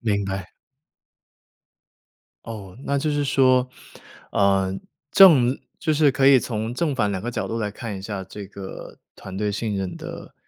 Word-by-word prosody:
明 100 -3 0
白。 95 -2 -4 2.0
哦， 105 -4 -8
那 140 - 0
就 150 +2 -1
是 145 -1 0
说， 130 -2 +3 0.6
呃， 95 -1 +2 0.4
正 140 -10 +7 0.2
就 155 -3 0
是 150 -2 +4
可 135 +1 +2
以 135 -1 +8
从 110 -1 -3
正 150 +3 -1
反 105 -5 +1
2 95 -2 -3
个 120 - -3
角 - - -3
度 115 - -3
来 105 -2 -2
看 105 -1 -6
一 - - -8
下 100 0 -5
这 100 +2 -9
个 95 -1 -9 0.2
团 95 0 -9
队 105 +1 -1
信 105 0 -2
任 95 -2 -4
的， - - -9
110 Hz, 170 characters per minute, -23 LUFS, 100-130 Hz, 2.0 s, 以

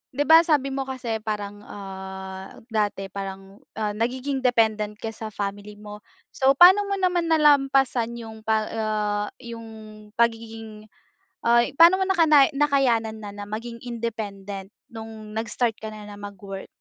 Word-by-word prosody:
'Di 290 - +2
ba 320 +1 +9
sabi 285 -4 +1
mo 270 - -1
kasi 245 -4 -3
parang, 205 -1 -4
ah, 190 -1 -8 0.2
dati 205 -3 -1
parang, 195 0 -7 0.2
ah, 210 -1 0
nagiging 260 +4 -2
dependent 220 -4 +2
ka 225 - -5
sa 220 0 -7
family 205 +1 -5
mo. 210 0 -9 0.4
So 265 0 +4
paano 375 +6 +8
mo 400 - 0
naman 355 -2 +1
nalampasan 270 -6 +3
yung 220 -1 -9
pa 220 -1 +1
ah, 210 -2 -1 0.2
'yung 230 -1 -8 0.5
pagiging 225 -2 -2 0.6
ay 235 0 +4
paano 340 +4 +7
mo - - +2
nakanay 315 -7 +5
nakayanan 245 -7 +1
na, 205 - -6
na 205 - -6
maging 230 +2 -6
independent 205 -5 -5 0.2
no'ng 220 -1 -9
nag-start 225 +1 -1
ka 220 0 -6
na, 210 -1 -10
na 205 - -9
mag-work? 200 -1 -8
220 Hz, 145 wpm, -24 LUFS, 205-260 Hz, 0.6 s, ba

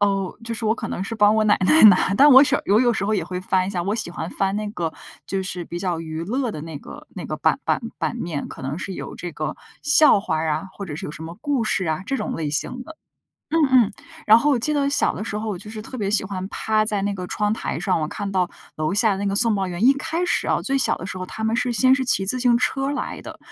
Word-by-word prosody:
哦， 195 -2 0
就 230 0 -4
是 225 0 -2
我 220 - +3
可 - - -6
能 185 - -4
是 225 - -5
帮 210 -1 +4
我 220 - +3
奶 205 - +4
奶 315 - +5
拿， 195 -1 +6
但 285 +7 +6
我 265 0 +9
时 - - +2
有 210 +4 +3
有 240 -2 +3
时 200 - -2
候 215 +1 +1
也 190 - 0
会 180 +1 -5
翻 185 0 +1
一 195 - -3
下， 180 -3 -2
我 205 +2 -1
喜 215 -6 -3
欢 165 -1 -5
翻 195 +1 -1
那 210 0 -3
个 170 -5 -3 0.4
就 195 -1 -1
是 180 -2 -4
比 175 - -6
较 175 -3 -2
娱 160 0 -5
乐 250 +4 -1
的 155 - -7
那 160 -2 -7
个 - - -12
那 - - -6
个 - - -4
版 - - +1
版 - - +1 0.2
版 - - -2
面， 160 -4 -4
可 - - -10
能 135 +3 -3
是 190 0 -5
有 - - -7
这 175 - -6
个 155 0 -4 0.3
笑 295 -5 +6
话 180 - -2
儿 160 0 -1
啊， 155 +5 -2
或 200 - -7
者 150 -5 -6
是 - - -6
有 150 - -7
什 165 - -9
么 165 +2 -8
故 285 -5 0
事 215 -3 0
啊， 160 +3 -1
这 270 +4 -2
种 - - -3
类 155 -3 -3
型 250 +12 -3
的。 320 +3 -12 0.6
嗯， 330 - +4 0.2
嗯， - - -6 0.3
然 220 +2 +8
后 295 +4 +2
我 265 - +2
记 300 +6 0
得 280 -1 +1
小 285 - +2
的 - - -5
时 215 -1 -4
候， 220 - -5
我 185 - -4
就 210 - -10
是 215 -1 -7
特 255 +2 -8
别 200 -1 -1
喜 210 - +2
欢 190 -1 -5
趴 215 0 0
在 205 -2 0
那 200 0 -1
个 180 -2 -5
窗 210 +2 -1
台 - - -3
上， 185 -4 0
我 155 - -2
看 200 +1 -5
到 180 -2 +1 0.3
楼 155 +5 -1
下 215 -1 +4
那 200 - -2
个 195 - 0
送 230 0 +4
报 190 -2 -1
员 180 +5 -2
一 270 - +7
开 325 +5 -2
始 - - 0
啊， - - +1
最 275 0 0
小 265 - +1
的 180 - -8
时 185 -1 -6
候， 185 - -5
他 220 - -6
们 220 +1 +1
是 245 +1 0
先 255 +3 +4
是 265 - -1
骑 220 -6 +1
自 250 +6 +1
行 240 -1 +4
车 270 +3 0
来 290 - -4
的， - - -10
205 Hz, 315 characters per minute, -22 LUFS, 180-235 Hz, 0.6 s, 我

